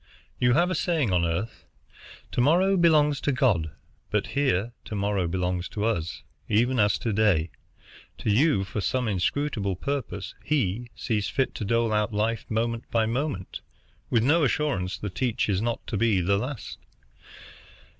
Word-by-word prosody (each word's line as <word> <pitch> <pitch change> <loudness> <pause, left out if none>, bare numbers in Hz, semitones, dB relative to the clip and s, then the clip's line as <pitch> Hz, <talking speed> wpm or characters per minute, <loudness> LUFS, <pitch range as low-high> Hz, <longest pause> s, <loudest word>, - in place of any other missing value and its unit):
You 125 0 +4
have 175 +6 +3
a - - +1
saying 160 - 0
on 90 -1 +2
earth, 95 +7 -3 0.6
'To - - +1
morrow 180 +8 +4
belongs 150 -5 +4
to 145 - +1
God;' 115 - +2 0.4
but - - 0
here 120 -5 +1
to 105 - -5
morrow 100 -3 0
belongs 90 0 -2
to 105 0 -2
us, 85 -8 -2 0.3
even 120 +4 +2
as 105 -2 +3
to 115 -4 -2
day. 95 -7 +2 0.7
To 105 - -1
you, 120 -2 +3
for 95 +2 -4
some 125 +5 0
inscrutable 100 +1 -1
purpose, 120 -3 -4
He 120 -5 -1
sees 105 -2 -1
fit 135 -1 0
to 105 - -4
dole 115 +1 +1
out 105 +1 +1
life 110 +2 -1
moment 115 +1 -2
by 115 -1 +2
moment, 120 -4 -3 0.5
with 115 -2 +2
no 155 +6 +4
assurance 130 -10 0
that 100 +1 -6
each 125 -1 +1
is 100 -2 +1
not 115 0 -2
to 110 - -3
be 110 -2 +3
the 100 +3 +2
last. 125 0 -6
115 Hz, 165 wpm, -26 LUFS, 100-135 Hz, 0.7 s, You